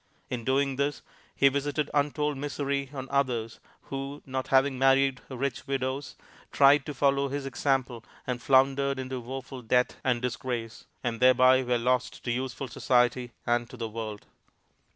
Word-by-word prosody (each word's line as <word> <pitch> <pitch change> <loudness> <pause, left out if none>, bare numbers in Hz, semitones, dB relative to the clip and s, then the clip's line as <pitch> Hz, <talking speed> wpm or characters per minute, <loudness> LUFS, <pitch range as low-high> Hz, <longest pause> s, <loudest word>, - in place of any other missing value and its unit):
In 120 -2 -3
doing 135 +1 +1
this, 140 +1 -1 0.3
he 140 - +5
visited 145 +2 -1
untold 150 0 +1
misery 140 0 -2
on 135 -2 -6
others, 120 -5 0 0.2
who, 135 +2 -6
not 130 -1 -3
having 135 -1 +3
married 135 -1 +3
rich 135 0 -3
widows, 135 0 -2 0.4
tried 140 +1 +5
to 150 - -3
follow 140 +1 +2
his 140 0 -3
example 130 -3 -1 0.2
and 125 -1 -3
floundered 135 +1 +3
into 130 0 -4
woeful 130 +1 -7
debt 125 +2 +1
and 125 -2 +1
disgrace; 125 -2 -4 0.2
and 115 -2 -2
thereby 130 +1 +6
were 125 -1 +1
lost 125 +1 0
to 120 - -1
useful 130 +1 -3
society 125 0 +1
and 120 0 +1
to 125 - -11
the 115 -2 -4
world. 110 -2 -6
130 Hz, 150 wpm, -28 LUFS, 125-140 Hz, 0.4 s, thereby